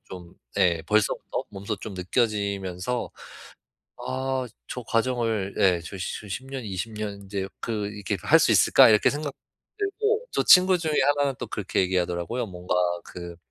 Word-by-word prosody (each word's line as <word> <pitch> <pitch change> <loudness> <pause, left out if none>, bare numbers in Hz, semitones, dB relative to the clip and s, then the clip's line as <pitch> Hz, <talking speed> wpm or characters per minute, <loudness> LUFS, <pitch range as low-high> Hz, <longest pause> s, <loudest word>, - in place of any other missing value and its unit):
좀 90 -2 -10 0.2
예. 85 -4 +3
벌써부터 105 +2 0
몸소 100 +2 -4
좀 105 -2 -7
느껴지면서 100 +1 -1 0.9
'아. 130 0 -2 0.2
저 125 - -5
과정을' 115 -4 0
예. 90 -3 +4
'저 95 - -8
저 100 +3 -5
10 125 +7 -5
년, 135 -3 -5
20 100 +2 -4
년 105 -1 -3
인제 95 -1 -4
그 110 -3 -2
이렇게 105 -1 -3
할 - - +6
수 - - +3
있을까?' - - +7
이렇게 105 -1 +5
생각도 145 -1 -4 0.4
들고 435 +3 0
저 - - +1
친구 185 0 +7
중에 160 -2 -1 0.2
하나는 140 -2 +1
또 125 - -4
그렇게 105 -3 -1
얘기하더라고요. 90 +5 -1
뭔가 90 -2 -4 0.3
그 85 -1 -9
105 Hz, 290 characters per minute, -25 LUFS, 95-130 Hz, 0.9 s, 있을까